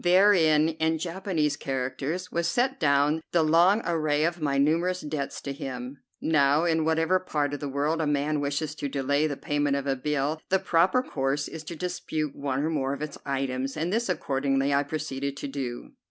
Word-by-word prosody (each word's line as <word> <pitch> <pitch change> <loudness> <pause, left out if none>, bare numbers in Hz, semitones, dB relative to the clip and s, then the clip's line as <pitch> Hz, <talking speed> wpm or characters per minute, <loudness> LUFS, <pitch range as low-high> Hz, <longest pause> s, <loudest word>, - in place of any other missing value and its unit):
Therein, 175 -4 +5
in 160 0 +2
Japanese 170 -3 -1
characters, 140 +6 -3
was 170 0 0
set 260 +2 0
down 145 0 +3
the 170 -2 +4
long 175 +7 +4
array 155 -3 +1
of 170 +1 -1
my 140 -2 +1
numerous 170 +6 +2
debts 145 -2 -4
to 140 - -4
him. 130 0 -6 0.2
Now, 150 -1 +3
in 160 -2 +2
whatever 160 +3 +2
part 150 -6 -1
of 145 - -3
the 145 - -4
world 150 +4 0
a 155 - 0
man 145 +1 0
wishes 145 +1 -2
to 145 - -2
delay 140 +2 +1
the 145 -2 -4
payment 145 -1 0
of 140 -1 -2
a 135 -1 +1
bill, 150 +3 -1
the 190 - +4
proper 185 +8 +2
course 135 - -1
is 160 -1 -8
to 170 - -6
dispute 155 -4 -3
one 140 -1 -2
or 155 - 0
more 140 -3 -1
of 145 - -6
its 150 - -6
items, 135 0 -2
and 165 +5 -1
this 230 -1 0
accordingly 135 -4 0
I 140 - +4
proceeded 140 -2 -4
to 140 - -4
do. 135 -3 -5
150 Hz, 195 wpm, -27 LUFS, 140-165 Hz, 0.2 s, Therein